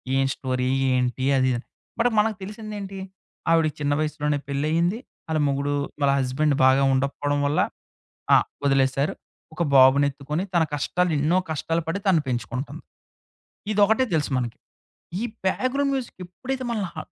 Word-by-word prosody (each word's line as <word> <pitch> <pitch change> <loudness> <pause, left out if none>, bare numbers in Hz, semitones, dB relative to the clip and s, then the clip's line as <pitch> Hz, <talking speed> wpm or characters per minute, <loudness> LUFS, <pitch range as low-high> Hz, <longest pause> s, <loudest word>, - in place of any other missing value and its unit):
ఏం 135 0 +3
స్టోరీ? 130 -1 -2 0.3
ఏంటి? 125 +1 0
అది 130 0 +3
ఇదిని? 120 0 -3 0.3
బట్ 240 +1 +4
మనకు 215 +1 +2
తెలిసిందేంటి? 205 -1 -7 0.5
ఆవిడకి 165 -2 +3
చిన్న 145 -1 +1
వయసులోనే 150 -1 -1
పెళ్లియింది. 160 +8 0 0.3
ఆళ్ళ 160 -1 0
ముగుడు 140 +1 0 0.3
వాళ్ళ 140 -1 +4
హస్బెండ్ 135 +3 +1
బాగా 130 +1 +5
ఉండకపోవడం 140 +2 0
వల్ల. 145 - +1 0.8
ఆహ్, - - +4 0.2
వదిలేసారు. 135 +1 +2 0.4
ఒక 170 - 0
బాబునెత్తుకొని 140 +4 +4
తన 170 - +5
కష్టాలు 175 +4 0
ఎన్నో 155 +5 +2
కష్టాలు 165 +2 -1
పడి 195 +5 -2
తనను 170 -5 +4
పెంచుకుంటుంది. 125 +2 -4 0.9
ఇదొకటే 215 +5 +4
తెలుసు 150 -3 0
మనకి. 120 -2 -4 0.6
ఈ - - -2 0.2
బ్యాక్గ్రౌండ్ 275 +7 +1
మ్యూజిక్ 260 -6 -5
ఎప్పుడైతే 255 +8 -5
మనల్ని 205 -6 -2
హ - - -9
150 Hz, 135 wpm, -24 LUFS, 135-190 Hz, 0.9 s, బాగా